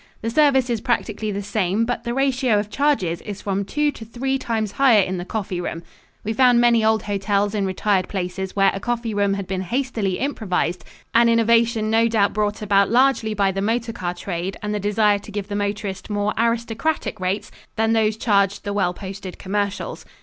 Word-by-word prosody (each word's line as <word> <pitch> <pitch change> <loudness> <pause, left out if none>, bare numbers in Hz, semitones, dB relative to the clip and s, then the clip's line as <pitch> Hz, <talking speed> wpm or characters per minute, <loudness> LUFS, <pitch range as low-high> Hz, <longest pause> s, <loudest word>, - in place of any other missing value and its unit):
The 230 - -1
service 265 -2 +4
is 230 -3 -1
practically 220 -3 -1
the 200 0 -4
same, 205 +1 0
but 245 0 -3
the 235 - -2
ratio 260 -4 +2
of 205 0 -2
charges 265 - +1
is 205 -2 -7
from 200 0 -1
two 295 +8 0
to 230 - -10
three 265 +4 -2
times 220 -4 -2
higher 235 -5 +5
in 185 0 -3
the 175 - -5
coffee 190 -4 -3
room. 165 -1 -5 0.4
We 220 - -2
found 245 0 +5
many 235 -2 +4
old 220 0 +2
hotels 205 0 0
in 200 -2 0
retired 190 0 0
places 190 0 -4
where 195 -1 +4
a 195 - -4
coffee 235 0 -2
room 200 -1 +1
had 200 -1 -4
been 185 0 -3
hastily 225 -3 -1
improvised, 195 -10 -1 0.3
an 235 0 +5
innovation 230 -1 +3
no 225 +1 +4
doubt 215 -3 +2
brought 210 0 -1
about 200 -1 +3
largely 240 -3 +2
by 195 -1 +2
the 195 +1 -3
motor 230 +2 -1
car 180 -5 -4
trade 180 +1 -4
and 210 0 -2
the 210 - -1
desire 205 0 +2
to 210 - -12
give 205 0 -5
the 205 - -3
motorist 200 -2 -3
more 205 0 0
aristocratic 230 +6 -1
rates 185 +3 -2 0.2
than 225 0 +2
those 220 -1 +2
charged 200 -3 +1
the 205 - -3
well 180 -3 0
posted 190 -1 -8
commercials. 200 +1 -3
210 Hz, 200 wpm, -22 LUFS, 195-230 Hz, 0.4 s, higher